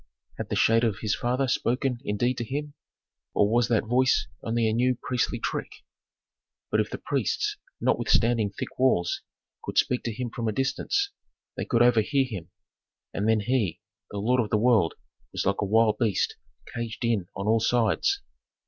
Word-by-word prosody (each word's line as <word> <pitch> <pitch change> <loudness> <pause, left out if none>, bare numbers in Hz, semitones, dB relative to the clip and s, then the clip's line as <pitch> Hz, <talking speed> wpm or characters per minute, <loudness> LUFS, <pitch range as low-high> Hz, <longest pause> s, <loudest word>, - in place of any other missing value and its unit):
Had - - -4
the - - -1
shade 115 +1 +4
of 110 -4 0
his 110 -1 0
father 125 +3 0
spoken 125 +1 0
indeed 120 +3 0
to - - -1
him, 145 +5 -4 0.6
or 100 - +4
was 115 +2 +2
that 115 -3 +2
voice 125 +2 +3 0.2
only 115 0 0
a 110 - +1
new 125 +2 +2
priestly 125 -1 -1
trick?" - - -3 1.0
But - - +2
if - - 0
the - - -5
priests, - - -1 0.2
notwithstanding 115 -3 +2
thick 100 - -7
walls, 105 -10 +2 0.4
could - - -5
speak 125 - +2
to 115 - -1
him 120 +1 -4
from 115 -1 -3
a 110 - 0
distance, 390 - 0 0.4
they - - -3
could 120 0 +3
overhear 125 +3 +3
him. 100 -10 -7 0.6
And 105 +3 0
then 110 -1 +3
he, 115 -5 0 0.3
the 105 - -6
lord 120 +5 +2
of 105 - -3
the 105 - +2
world, 110 -7 +3 0.4
was - - -2
like 100 0 +1
a - - +1
wild 110 +1 +3
beast 110 -5 +1 0.4
caged 115 +1 -4
in 110 -6 0
on 100 - -4
all 110 +1 +3
sides. 120 - +1
115 Hz, 175 wpm, -26 LUFS, 110-125 Hz, 1.0 s, shade